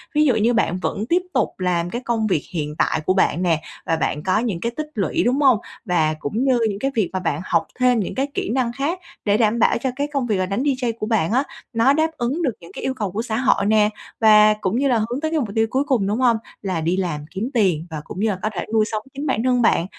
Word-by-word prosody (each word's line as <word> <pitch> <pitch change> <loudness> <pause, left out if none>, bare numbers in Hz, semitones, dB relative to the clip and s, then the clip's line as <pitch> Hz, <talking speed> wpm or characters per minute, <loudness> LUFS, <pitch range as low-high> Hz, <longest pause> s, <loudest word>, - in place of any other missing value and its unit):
Ví 300 0 +4
dụ 260 -6 +3
như 225 +2 +2
bạn 205 -6 +1
vẫn 205 +3 -2
tiếp 350 +2 +3
tục 250 -5 +2
làm 175 -2 0
cái 240 +6 -4
công 225 -2 0
việc 170 -7 0
hiện 150 -3 -3
tại - - +1
của 185 - +3
bạn 185 -2 +2
nè, 165 -3 +2 0.2
và 165 - +1
bạn 150 -1 -2
có 190 +3 +2
những 220 -7 -2
cái 235 +6 -2
tích 305 0 -3
lũy, 200 - 0
đúng 255 +5 +1
hông? 265 -5 +5 0.3
Và 165 -5 +2
cũng 210 - -2
như 260 -3 +3
những 200 -1 -4
cái 270 +4 -1
việc 215 -6 +1
mà 185 - -1
bạn 165 -4 -2
học - - +1
thêm 250 -2 +4
những 200 - -3
cái 270 +1 0
kỹ - - -2
năng 245 0 0
khác 290 +8 -2 0.3
để 205 0 +3
đảm 225 0 +2
bảo - - +3
cho 260 +3 -2
cái 285 +2 -1
công 275 -3 0
việc 210 -4 +1
là 185 - 0
đánh 200 +7 -2
DJ 255 -5 0
của - - -2
bạn 215 -6 +1
á, 260 +4 +3 0.3
nó 235 +4 +4
đáp 315 +2 +1
ứng 265 +8 -1
được 260 -6 +1
những 170 - -13
cái - - -7
yêu 265 - 0
cầu 210 -7 -3
của 210 +4 -2
xã 225 -2 -3
hội 255 -4 +2
nè, 210 0 +4 0.3
và 215 -1 +7
cũng 190 +4 0
như 280 - +2
là 250 -3 +3
hướng 235 +5 -2
tới 315 0 -1
cái 320 - +1
mục 235 -7 -2
tiêu 225 0 +2
cuối 265 +4 +1
cùng, 255 -9 +1
đúng 210 +4 -1
hông? 240 -3 +4 0.2
Là 185 -5 -2
đi 170 +3 0
làm 160 -6 -2
kiếm 200 +6 -3
tiền, 180 -8 +1
và 155 -2 -5
cũng 175 - -8
như 220 +2 +2
là 195 - -1
có 215 - 0
thể 175 - -3
nuôi 220 -1 +4
sống 215 -1 -3
chính 280 +2 -5
bản 235 -4 0
thân 250 -1 +2
bạn, 220 -6 +3
220 Hz, 285 wpm, -21 LUFS, 185-255 Hz, 0.3 s, và